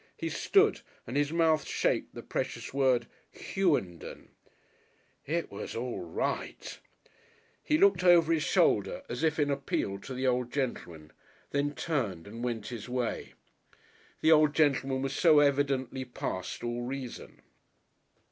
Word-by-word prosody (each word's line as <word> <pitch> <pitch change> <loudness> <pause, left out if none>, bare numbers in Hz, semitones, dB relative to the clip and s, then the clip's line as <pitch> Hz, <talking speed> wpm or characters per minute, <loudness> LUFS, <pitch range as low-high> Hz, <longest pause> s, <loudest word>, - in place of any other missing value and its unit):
He - - -3
stood - - +3 0.2
and 120 - -6
his 145 +1 +1
mouth 160 -2 +3
shaped - - -1
the - - -7
precious - - -4
word, 130 -3 +2 0.2
"Hughenden." 145 - -2 1.0
It 165 +3 -2
was 100 - -6
all 120 +1 -3
right! 85 -2 -4 0.8
He 150 - +2
looked 195 0 +4
over 170 -2 +6
his 160 - +1
shoulder 160 - +2
as 120 +3 -4
if 160 -1 +2
in 145 -2 +1
appeal 135 -8 -2
to 130 +6 -8
the 130 +1 -2
old 125 -1 +1
gentleman, 85 - -4 0.4
then 145 +1 0
turned 110 - -2
and 115 +4 -8
went 115 -4 -3
his 120 -1 -7
way. 125 -1 -3 0.9
The 160 - +4
old 155 -1 +5
gentleman 135 -3 +2
was 135 0 -2
so 160 +1 +5
evidently 140 -2 +2
past 95 -7 -5
all 120 0 -2
reason! 130 0 -7
135 Hz, 140 wpm, -30 LUFS, 120-150 Hz, 1.0 s, over